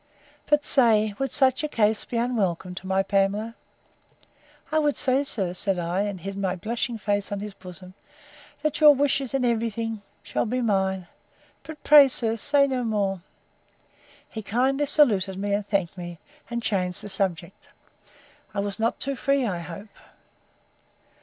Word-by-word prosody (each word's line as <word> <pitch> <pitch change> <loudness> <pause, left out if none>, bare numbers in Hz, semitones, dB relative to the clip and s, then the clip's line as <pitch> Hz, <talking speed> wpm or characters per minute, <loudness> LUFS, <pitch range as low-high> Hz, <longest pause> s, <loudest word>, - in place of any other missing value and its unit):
—But 295 0 +3
say, 220 -5 +3
Would 270 0 -1
such 265 0 +2
a - - 0
case 220 -6 +1
be 240 - -4
unwelcome 195 -7 -1
to 190 +1 -8
my 190 0 +1
Pamela?—I 205 +9 -4
will 295 -1 +2
say, 265 +1 +1
sir, 195 -10 -2
said 190 +1 -1
I, 175 +2 -1
and 200 -2 -3
hid 195 +2 -6
my 195 -2 -1
blushing 230 +5 -3
face 205 -1 -2
on 200 - -2
his 210 0 -6
bosom, 185 -1 -11 0.7
that 305 0 -1
your 300 -1 +8
wishes, 275 -1 +1
in 260 -2 +1
every 230 -1 +1
thing, 225 0 -4 0.2
shall - - -2
be 250 +3 -1
mine; 190 -5 0 0.6
but, 315 -2 -11
pray, 290 -2 +8
sir, 230 -3 -1
say 280 +5 +3
no 260 -2 -2
more. 200 -5 -1 1.1
He 220 - -7
kindly 265 +7 0
saluted 205 -11 +3
me, 200 +1 -2
and 205 0 -1
thanked 195 -4 -1
me, 175 -2 -7 0.3
and 235 -1 -3
changed 185 -2 -1
the 205 - -7
subject.—I 190 +2 -4
was 200 +1 -3
not 225 +1 0
too 275 0 -1
free, 275 0 +1
I 185 -6 -2
hope. 185 +5 -9
215 Hz, 160 wpm, -25 LUFS, 195-255 Hz, 1.1 s, your